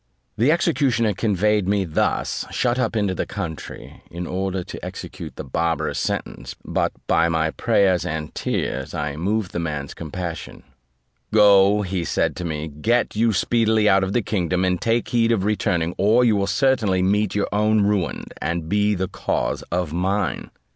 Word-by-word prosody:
The 125 +7 +3
executioner 135 -10 +2
conveyed 105 0 +1
me 100 -1 +1
thus 80 - -1
shut 125 0 0
up 115 -2 0
into 100 -3 +1
the - - -3
country, 90 -7 -7
in 85 +1 -6
order 95 +1 -2
to - - -9
execute - - -7
the - - -6
barbarous 80 +5 -1
sentence; - - -4
but - - 0
by 85 +1 +3
my 80 -1 +1
prayers 100 -5 +2
and 75 0 -4
tears, 65 +1 -3
I 75 -1 -3
moved 95 +4 -1
the - - -3
man's 75 -4 -4
compassion: 85 +1 -6 0.7
"Go," 105 -1 +5
said 90 -3 -1
he - - -14
to - - -6
me, 80 -1 -3
"get 110 +14 0
you 115 +1 +3
speedily 110 +1 +2
out 95 -1 +4
of 95 +1 -2
the 120 - +1
kingdom, 90 -3 0
and 90 -1 0
take 115 +1 0
heed 115 -1 +2
of 105 -5 +1
returning, 90 -5 0
or 110 +5 +4
you 110 -3 +4
will 100 -1 0
certainly 110 -8 +2
meet 100 +2 +1
your 105 - +1
own 105 +1 +2
ruin, 100 -3 0 0.2
and 85 -1 -2
be 105 +3 +2
the 95 0 -2
cause - - -2
of 85 -3 -1
mine." 95 +3 -1
95 Hz, 170 wpm, -22 LUFS, 85-110 Hz, 0.7 s, Go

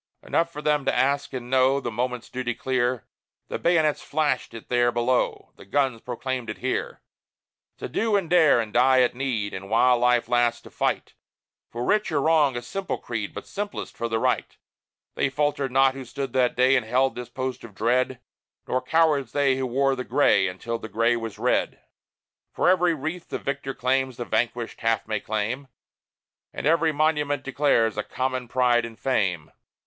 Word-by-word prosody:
Enough 170 0 0
for 150 -1 -8
them 150 -1 +2
to - - +1
ask 140 +2 +1
and 125 -2 -6
know 130 +2 +3
The 120 -3 -4
moment's 125 +1 -3
duty 125 -2 -3
clear 125 -1 -1 0.4
The - - -3
bayonets 160 -3 +2
flashed 150 -5 -1
it 115 - -10
there 120 -1 +2
below, 120 +1 0
The - - -13
guns 130 +1 0
proclaimed 125 -1 -4
it 105 - -5
here: 130 +1 -3 0.7
To - - -5
do 220 - 0
and 195 -4 +1
dare, 160 -7 +5
and 110 -2 -3
die 130 +1 +5
at 125 - +2
need, 120 -6 -2
But 95 +1 -7
while 120 +3 +4
life 125 -1 +3
lasts, 120 -1 +1
to - - -13
fight - - -2 0.6
For 120 +1 -5
right 210 +7 +1
or 150 - +1
wrong 150 -4 +3
a 120 - -5
simple 190 +10 -4
creed, 110 -4 -4
But - - -8
simplest 205 0 -5
for 115 - -3
the 115 - 0
right. - - -1 0.6
They 140 - 0
faltered 145 -1 -1
not 135 0 +4
who 135 0 -7
stood 130 +1 -5
that 125 -2 +2
day 130 +2 +4
And 125 - +2
held 130 +4 +1
this 125 -1 -7
post 130 -1 -4
of 110 -4 -12
dread; 125 +4 +1 0.5
Nor 130 - 0
cowards 155 -7 +2
they 140 -2 +3
who 130 -1 -1
wore 135 +2 +1
the 125 - -4
gray 100 -10 +3
Until 115 +6 -4
the 110 - -8
gray 115 +2 +2
was 115 -3 -5
red. - - 0 0.7
For - - 0
every 180 -2 +4
wreath 160 +5 -5
the - - -2
victor 140 -1 -4
wears 130 0 0
The 120 - -4
vanquished 120 0 -2
half 115 -2 0
may 110 -1 -1
claim; 110 +7 -3 0.8
And - - -6
every 165 +1 +3
monument 150 -2 0
declares 130 -6 +1
A - - -1
common 130 +1 -3
pride 120 -1 +2
and 115 -1 -8
fame. 95 - -1
130 Hz, 185 wpm, -25 LUFS, 120-140 Hz, 0.8 s, dare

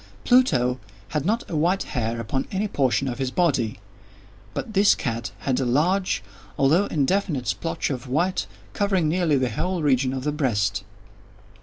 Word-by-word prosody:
Pluto 130 - +3 0.3
had 150 +1 -1
not 225 +3 0
a 165 - -4
white 175 +5 +2
hair 115 -1 -2
upon 130 +4 -2
any 200 +2 0
portion 135 -5 +1
of 125 +1 -4
his 130 -1 0
body; 130 - 0 0.8
but 220 - -4
this 200 +1 +5
cat 120 -2 -3
had 130 -2 0
a - - +1
large, 155 - +1 0.3
although 155 +9 +4
indefinite 155 -2 0
splotch 165 +8 -2
of 130 -1 -5
white, 170 +8 0 0.3
covering 195 -5 +1
nearly 160 -2 +2
the 130 -2 0
whole 180 -3 -2
region 130 -2 +2
of 130 -1 -4
the 150 - 0
breast. 105 -9 0
140 Hz, 160 wpm, -24 LUFS, 125-180 Hz, 0.8 s, this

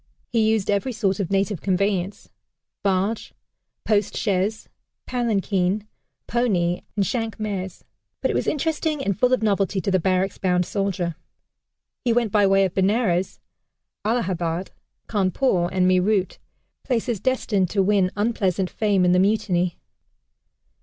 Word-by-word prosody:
He 220 -2 +3
used 220 -3 +1
every 205 +6 0
sort 205 -3 0
of 190 -4 -1
native 195 -2 0
conveyance 195 0 -1 0.5
barge, 195 +3 -1 0.5
post 210 -2 +1
chaise, 205 +2 -1 0.4
palanquin, 205 -4 0 0.4
pony, 185 -8 0
and 200 -2 +1
"shank's 225 0 -2
mares" 195 -4 -4 0.4
but - - 0
it - - -2
was - - -1
interesting 305 -1 -1
and 200 - +1
full 250 +5 +2
of 255 -3 +2
novelty 200 -2 +1
to 195 - -1
the 185 - +3
barracks 185 +2 0
bound 180 -1 +1
soldier. 180 -5 -2 0.9
He 240 - +2
went 235 -3 +1
by 205 -1 +4
way 195 0 +4
of 185 - -3
Benares, 190 -2 +1 0.6
Allahabad, 185 -6 -1 0.4
Cawnpore, 190 -2 +1
and 185 -1 +2
Meerut 185 +1 +2 0.4
places 235 -3 -1
destined 205 -6 0
to 195 0 +1
win 195 -2 +3
unpleasant 195 -4 0
fame 200 -4 +2
in 180 - +4
the 180 - +4
Mutiny. 185 -3 +1
200 Hz, 135 wpm, -23 LUFS, 185-220 Hz, 0.9 s, by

